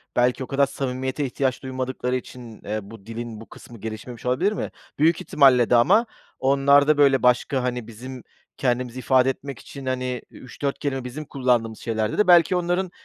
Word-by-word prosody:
belki 125 +2 +2
o - - -7
kadar 140 0 +2
samimiyete 130 +1 -3
ihtiyaç 130 0 -2
duymadıkları 130 -1 -3
için, 120 -3 -8
eee, 105 +1 -2
bu 100 0 -13
dilin 115 -1 -7
bu 115 - -13
kısmı 120 - -13
gelişmemiş 110 +3 -8
olabilir 130 +11 +1
mi? 210 - -4 0.3
Büyük 160 +2 +3
ihtimalle 130 -5 +4
de - - +5
ama 195 - +5 0.3
onlarda, 140 +2 +4
böyle, 140 -2 +4
başka, 125 +1 +2
hani, 125 -2 -3
bizim 125 +3 -9 0.3
kendimizi 125 -1 -1
ifade 130 0 +3
etmek 135 0 -5
için, 140 -1 -10
hani, 125 -1 -2
3-4 135 +2 -5
kelime 135 -3 -2
bizim 130 +5 -7
kullandığımız 120 -5 0
şeylerde 110 -1 -2
de 210 - +3
belki 175 0 +6
onların 180 +1 -1
130 Hz, 170 wpm, -23 LUFS, 120-140 Hz, 0.3 s, belki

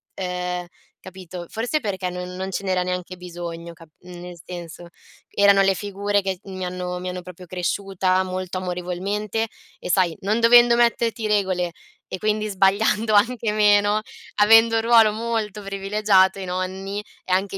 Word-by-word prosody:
ehm, 180 -1 -3 0.3
capito. 185 -2 -9
Forse 245 +7 -1
perché 190 -4 -3
non 180 0 -6
non 190 +1 -4
ce 195 - -3
n'era 185 -2 0
neanche 180 0 -4
bisogno 170 -1 -7
cap 165 0 -16
mhmm, 180 -1 -11
nel 180 -1 -10
senso: 175 -1 -8 0.4
erano 200 -1 +4
le 195 0 +4
figure 205 +1 -1
che 190 0 -1
s 180 - -23
mi 185 -1 -5
hanno 180 0 -4
mi 180 0 -4
hanno 180 0 -5
proprio 180 0 -11
cresciuta 185 +1 0
molto 185 0 -4
amorevolmente 185 +5 -3 0.3
e - - -7
sai, 175 -3 +2
non 210 +4 0
dovendo 240 +1 +7
metterti 235 -1 +1
regole 185 -4 0 0.4
e - - -4
quindi 215 +1 0
sbagliando 205 +3 +2
anche 225 +1 +2
meno, 205 0 +4 0.4
avendo 225 +2 +6
un 225 - +2
ruolo 225 -2 +5
molto 220 -2 -3
privilegiato 195 -1 +2
i 190 - -5
nonni, 190 +3 -4 0.2
è - - -6
anche 195 +1 0
190 Hz, 160 wpm, -22 LUFS, 180-210 Hz, 0.4 s, dovendo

